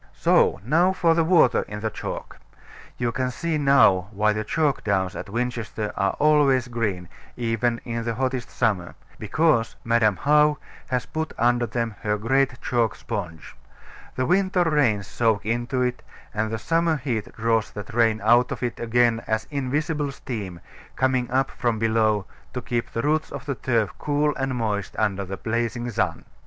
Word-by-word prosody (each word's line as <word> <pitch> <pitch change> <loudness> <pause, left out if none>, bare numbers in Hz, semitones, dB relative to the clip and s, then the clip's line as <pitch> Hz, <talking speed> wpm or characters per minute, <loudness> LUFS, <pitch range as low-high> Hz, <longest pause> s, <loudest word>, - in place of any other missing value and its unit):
So - - +3
now 170 +8 +3
for 175 -3 +3
the 165 0 +2
water 160 -7 +4
in 105 0 -6
the 110 0 -2
chalk. - - -6 0.6
You 120 -1 0
can 130 +2 -1
see 160 +4 -2
now 135 -10 +4
why 105 0 +2
the 110 +1 -2
chalk 150 +4 0
downs 95 -2 0
at - - -6
Winchester 115 -2 -3
are 95 0 +1
always 145 -4 +3
green, 105 -7 -2 0.3
even 115 0 0
in 115 -1 -3
the 115 -1 -2
hottest 130 -1 -2
summer: 100 -7 -1 0.2
because 115 +1 +1
Madam 115 -3 +3
How 150 +4 +3 0.3
has 125 -2 -1
put 160 0 -4
under 120 0 +2
them 115 0 -2
her 105 0 0
great 130 +4 +1
chalk 120 -3 0
sponge. 90 -9 -6 0.6
The 130 - 0
winter 185 +1 +2
rains 140 - +2
soak 110 0 0
into 120 +3 -1
it; 125 0 -2 0.3
and 110 +1 -1
the 110 - -2
summer 165 +6 +1
heat 120 -6 -3
draws 115 -1 +1
that 105 +3 -8
rain 115 -2 +2
out 120 +3 +4
of - - -4
it 120 - -3
again 120 0 +2
as 110 0 0
invisible 145 +2 -1
steam, 100 -10 -6 0.3
coming 130 -2 +1
up 130 +1 +1
from 120 -3 -1
below, 110 -2 +1 0.3
to 125 - -2
keep 120 -1 -2
the 115 - -3
roots 155 +2 0
of 140 0 -7
the 140 - -1
turf 115 -4 0
cool 150 0 +1
and 135 -1 -2
moist 105 -5 -2
under 100 -3 0
the 95 +1 -6
blazing 120 +1 -2
sun. 95 -5 -1
120 Hz, 170 wpm, -24 LUFS, 110-135 Hz, 0.6 s, water